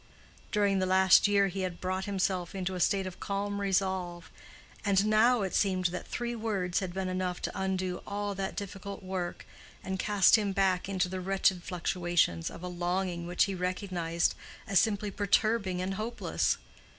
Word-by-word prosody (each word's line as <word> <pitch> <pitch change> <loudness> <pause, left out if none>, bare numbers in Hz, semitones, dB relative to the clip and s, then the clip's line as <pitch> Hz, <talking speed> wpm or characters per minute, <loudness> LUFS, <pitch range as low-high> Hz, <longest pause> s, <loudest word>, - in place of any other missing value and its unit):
During 200 -2 +2
the 185 - +1
last 190 +1 +6
year 200 -1 +4
he 190 +1 -4
had 180 -2 -3
brought 185 +1 -2
himself 190 -2 -1
into 190 0 -2
a 180 - -4
state 190 +2 +2
of 185 -1 -7
calm 200 0 -2
resolve, 190 -3 -1 0.5
and 200 -1 +3
now 220 +2 +4
it 190 - -3
seemed 185 -3 +2
that 180 - -5
three 240 0 -3
words 200 -6 -1
had 185 -2 -4
been 190 +1 -3
enough 185 -1 -2
to - - -1
undo 185 -1 -2
all 205 0 -2
that 195 0 -4
difficult 200 0 -6
work, 185 -2 -4 0.4
and 190 0 -3
cast 205 +1 +5
him 205 -2 -1
back 190 -1 +1
into 185 -2 +1
the 185 0 -4
wretched 190 -1 +2
fluctuations 175 - 0
of 170 - -10
a - - -3
longing 175 0 -2
which 175 0 +3
he 200 - -1
recognized 180 -2 -1 0.3
as 195 -2 +4
simply 210 -1 0
perturbing 200 -2 +1
and 190 +1 -2
hopeless. 225 +4 -1
190 Hz, 175 wpm, -30 LUFS, 180-200 Hz, 0.5 s, last